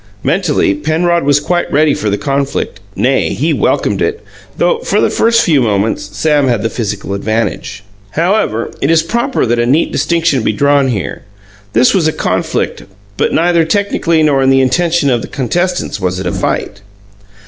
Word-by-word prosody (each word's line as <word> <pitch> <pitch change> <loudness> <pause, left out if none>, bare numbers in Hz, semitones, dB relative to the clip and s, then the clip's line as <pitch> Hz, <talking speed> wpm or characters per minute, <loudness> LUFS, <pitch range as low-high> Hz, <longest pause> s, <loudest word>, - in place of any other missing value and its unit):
Mentally, - - +1
Penrod 165 - 0
was 145 0 +3
quite 175 +4 -1
ready 150 0 +3
for 105 - -2
the 100 - 0
conflict 140 - -2 0.2
nay, - - +1
he - - 0
welcomed - - 0
it - - -1 0.3
though, 480 - +1
for - - 0
the - - +2
first 230 +1 +3
few 150 -5 +3
moments, 105 -2 -1
Sam 150 -3 +2
had 120 -4 0
the 115 - -1
physical 105 -3 -4
advantage. 105 -1 -3 0.3
However, 165 - 0
it 140 - +1
is 165 -1 +3
proper 235 +9 -1
that 120 0 0
a 120 - +1
neat 145 +6 +2
distinction 160 -2 +1
be 110 - 0
drawn 140 +3 +2
here. 110 -7 -3 0.5
This 125 +3 +4
was 175 -5 +2
a 155 - 0
conflict; - - -2 0.3
but - - 0
neither 170 0 +2
technically 170 -2 +1
nor 140 -3 +2
in 135 - +3
the 135 0 +4
intention 160 +2 +1
of 120 -2 +1
the - - -7
contestants 175 - -2
was 90 -1 -2
it 95 - -5
a 90 - -1
fight. 100 - -3
140 Hz, 180 wpm, -13 LUFS, 115-170 Hz, 0.5 s, This